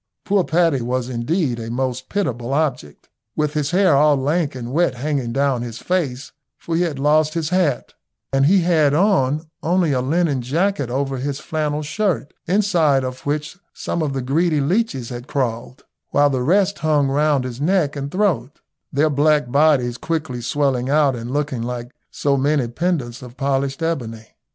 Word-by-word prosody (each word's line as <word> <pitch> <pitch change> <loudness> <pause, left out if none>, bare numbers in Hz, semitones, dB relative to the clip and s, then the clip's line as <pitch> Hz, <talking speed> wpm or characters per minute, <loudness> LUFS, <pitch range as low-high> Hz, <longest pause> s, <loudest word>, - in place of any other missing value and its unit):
Poor 200 -2 +2
Paddy 165 -5 +2
was 125 +1 -2
indeed 130 +1 -1
a 115 0 -6
most 130 +1 -3
pitiable 130 - -2
object, 130 - -2 0.3
with 150 -1 0
his 150 -2 -1
hair 185 -3 +4
all 150 +1 +5
lank 145 +2 0
and 120 -1 -6
wet 160 -3 +1
hanging 135 -2 -2
down 135 -1 +1
his 120 -2 -6
face, 135 -2 -2 0.3
for 165 - -4
he 170 - +2
had 165 -5 -1
lost 155 +3 +2
his 160 -2 -1
hat, 180 -8 0 0.4
and 135 +1 +4
he 190 +3 +5
had 155 -4 +3
on 155 -5 +2 0.2
only 175 -1 +1
a 130 -2 +1
linen 145 0 +1
jacket 160 +3 0
over 135 +1 -2
his 140 +2 -3
flannel 150 -1 -2
shirt, 155 0 -1
inside 170 -8 +2
of 130 +1 -6
which 150 +3 -3 0.2
some 170 - -3
of 150 -3 -1
the 135 -1 -3
greedy 155 +4 +1
leeches 145 - 0
had 120 0 -7
crawled, 125 -3 -3 0.3
while 145 0 +3
the 130 -2 -1
rest 195 +8 +2
hung 150 -3 +2
round 145 0 +2
his 125 +1 -6
neck 160 -3 +1
and 140 0 -4
throat, 165 - -1 0.3
their 145 +3 +2
black 145 -2 +2
bodies 140 -5 +3
quickly 155 -7 -3
swelling 135 -1 0
out 145 -2 +3
and 115 0 -6
looking 140 -3 -2
like 120 +1 -5 0.2
so 140 -1 0
many 140 -1 +1
pendants 130 -3 -2
of 125 0 -11
polished 135 +2 -1
ebony. 115 -9 -3
145 Hz, 175 wpm, -20 LUFS, 130-160 Hz, 0.4 s, all